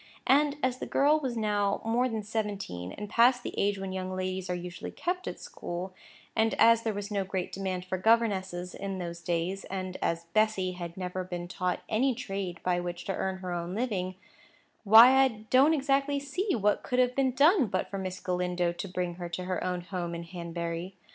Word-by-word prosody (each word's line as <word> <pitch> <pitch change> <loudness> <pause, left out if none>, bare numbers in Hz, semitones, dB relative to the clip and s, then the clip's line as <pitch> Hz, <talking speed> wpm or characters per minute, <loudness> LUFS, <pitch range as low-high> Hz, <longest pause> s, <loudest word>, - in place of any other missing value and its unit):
And 285 +1 +4
as 255 0 +1
the - - -4
girl 295 +3 +4
was 255 -5 -3
now 205 -2 +1
more 240 +3 +2
than 220 -2 -3
seventeen, 200 - -3
and 210 - -6
past 245 +4 +4
the - - -5
age 200 0 +1
when 195 -1 -5
young 185 0 -3
ladies 185 0 -3
are 180 - 0
usually 175 0 -6
kept 360 +1 -3
at - - -5
school, 180 +2 -6 0.4
and 225 0 +2
as 230 0 +6
there 225 -1 -1
was 205 +1 -5
no 200 -1 0
great 190 -1 -3
demand 185 -2 -3
for 185 0 -3
governesses 190 -5 +1
in 195 -1 -4
those 170 -1 -5
days, 175 +3 -1
and 185 -1 -4
as 170 0 -1
Bessy 215 -4 +2
had 175 -1 -7
never 185 0 -3
been 175 -1 -5
taught 180 0 -2
any 250 +4 +2
trade 195 -7 -4
by 180 -1 +1
which 175 0 -5
to 195 - -1
earn 190 0 -2
her 180 -1 -4
own 175 +1 -3
living, 195 -6 -2 0.7
why 230 +5 +9
I - - +5 0.2
don't 275 +5 +6
exactly 280 0 +1
see 360 +8 -1
what 210 -2 +2
could 250 - -2
have 250 0 +3
been 265 -2 +2
done 295 - +5
but 185 -1 -2
for 195 - -3
Miss 185 -1 -4
Galindo 180 -1 0
to 175 +3 -6
bring 180 -1 -2
her 175 - -4
to 170 +2 -4
her 180 0 -2
own 180 -1 -1
home 175 -1 -4
in 170 - -5
Hanbury. 170 +1 -5
190 Hz, 205 wpm, -29 LUFS, 180-230 Hz, 0.7 s, why